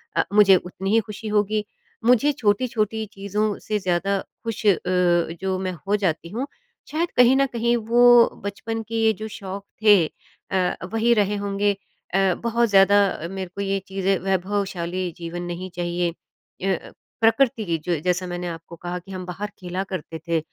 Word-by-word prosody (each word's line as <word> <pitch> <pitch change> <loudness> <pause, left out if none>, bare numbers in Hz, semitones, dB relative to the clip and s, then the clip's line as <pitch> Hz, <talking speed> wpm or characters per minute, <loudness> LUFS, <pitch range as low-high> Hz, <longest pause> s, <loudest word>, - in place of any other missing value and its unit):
अ, - - +3
मुझे 205 -2 +7
उतनी 185 +2 -3
ही 225 - +6
ख़ुशी 215 +1 -7
होगी। 210 0 +1 0.4
मुझे 250 +4 +5
छोटी-छोटी 220 -3 0
चीज़ों 205 +1 -1
से 215 -1 -2
ज़्यादा 185 +1 0 0.3
ख़ुश 225 -1 -4
अ, 205 - +7
जो 180 +1 +1
मैं 185 -1 -2 0.2
हो 205 - +3
जाती 170 -4 -1
हूँ, 245 +9 -3 0.4
शायद 335 +3 -1
कहीं 250 +1 +7
न 275 0 +4
कहीं 235 0 +2
वो 240 +1 +6
बचपन 225 +3 -4
के 225 -1 +3
जो 215 +2 -6
शौक 195 -2 -7 0.2
थे 205 -6 +7 0.5
अ, 185 -2 +1 0.2
वही 230 +1 +3
रहे 210 -2 +2
होंगे 200 +1 +1 0.4
अ, 195 -1 +3
बहुत 235 0 +2
ज़्यादा 200 0 +6 0.3
मेरे 190 -1 -5
को 200 - -3
ये 195 0 0
चीज़ें 195 0 0
वैभवशाली 185 -2 -1
जीवन 170 +1 -5
नहीं 175 +1 -5
चाहिए। 175 0 -1 0.5
ए 195 0 +1
अ, - - -10 0.3
प्रकृति 225 0 +3
की 170 -3 0
जो 170 -4 0
जैसा 180 +1 0
मैंने 175 0 -4
आपको 165 0 -8
कहा 175 +1 -5
कि 195 +3 -14
हम 185 -1 -5
बाहर 185 +4 -4
खेला 185 +1 -3
करते 170 -4 -6
थे, 165 -1 +2
195 Hz, 170 wpm, -23 LUFS, 180-220 Hz, 0.5 s, मुझे